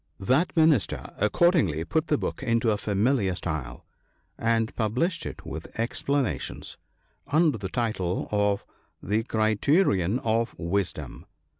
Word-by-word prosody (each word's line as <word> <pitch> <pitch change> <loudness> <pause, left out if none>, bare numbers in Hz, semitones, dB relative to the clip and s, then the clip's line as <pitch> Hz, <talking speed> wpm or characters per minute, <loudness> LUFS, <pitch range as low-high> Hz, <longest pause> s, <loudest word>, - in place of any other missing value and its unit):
That 135 - +1
Minister 155 - +2
accordingly 105 - +2
put 160 - 0
the 150 - +2
book - - -4
into 115 -3 +2
a 105 - +1
familiar 105 -1 +1
style, 75 -9 -5 0.5
and 115 0 0
published 125 - -1
it - - -9
with - - -8
explanations, 120 - -2 0.5
under 150 -4 +2
the 95 -2 -4
title 100 -6 -1
of 105 -1 +1 0.4
the 105 +4 +1
"Criterion 110 - +2
of 115 0 0
Wisdom." 95 +3 -3
110 Hz, 120 wpm, -26 LUFS, 100-135 Hz, 0.5 s, Minister